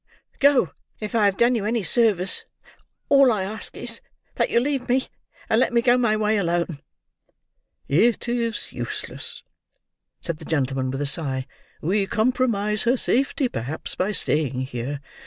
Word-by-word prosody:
Go! 275 - +4 0.3
If 210 -1 -5
I 220 -3 +3
have 200 -1 +2
done 240 +1 +4
you 225 -4 -1
any 225 +1 0
service 200 -5 +2 0.6
all 275 -2 +6
I 205 -4 0
ask 215 +3 -6
is, - - -1 0.3
that - - 0
you - - +3
leave 270 0 -2
me, 255 +1 +2 0.4
and - - +3
let - - +2
me 235 -1 +3
go 245 0 +5
my 235 -4 +2
way 215 0 +1
alone." 170 -4 -1 1.1
"It 225 +12 +2
is 235 -1 -2
useless," - - -5 0.8
said 170 -2 -4
the - - -10
gentleman, 135 -4 -1
with 135 +2 -3
a - - -1
sigh. 135 -2 0 0.4
"We 195 +4 +1
compromise 215 -3 +1
her 245 +2 +2
safety, 270 +2 +2
perhaps, 135 - -5
by 190 +3 -1
staying 150 -9 +1
here. 130 +2 -4
210 Hz, 155 wpm, -23 LUFS, 155-240 Hz, 1.1 s, all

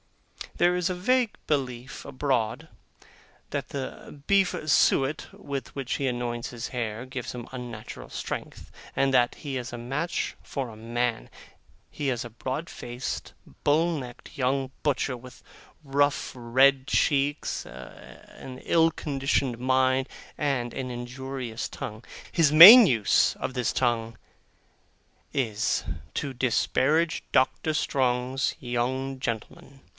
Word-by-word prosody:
There 175 +1 +3
is 180 0 0
a 180 - -2
vague 245 +5 +1
belief 130 -4 -3
abroad, 130 -5 -1 0.8
that - - -3
the 140 +1 -7
beef 195 -2 +3 0.2
suet 140 +1 +3
with 140 -4 -6
which 135 -2 -3
he 140 - -1
anoints 120 -1 -3
his 120 -1 -5
hair 115 -2 -4
gives 130 -2 -6
him 120 -2 -7
unnatural 120 -4 -8
strength, - - -6 0.2
and 135 -1 +2
that 120 -2 +3
he 140 -4 -5
is 125 0 -5
a - - -4
match 135 +8 -3
for 135 -4 -4
a 110 - -11
man. 115 - -2 0.6
He 145 -2 -3
is 120 -2 -2
a - - -7
broad 130 +8 -4
faced, 120 +2 -6 0.3
bull 165 +3 +2
necked, 125 +2 -9
young 135 0 0
butcher, 140 -2 0
with 125 +1 -13 0.4
rough 145 0 +1
red 130 +3 +3
cheeks, 145 0 +1
an 125 - -12
ill 165 -1 +4
conditioned 135 -4 -1
mind, 130 +1 +2 0.3
and 130 -5 -1
an 130 -1 -4
injurious 125 -1 -5
tongue. 110 +2 -7 0.3
His 160 -4 +3
main 200 +9 +12
use 115 - +3
of - - -4
this 125 -3 0
tongue, 115 -2 0 1.2
is, 110 -6 0 0.3
to 140 -3 -2
disparage 135 +6 +1
Doctor 130 +4 +2
Strong's 130 -2 0
young 130 +2 -2
gentlemen. 130 +3 -6
130 Hz, 125 wpm, -27 LUFS, 120-140 Hz, 1.2 s, main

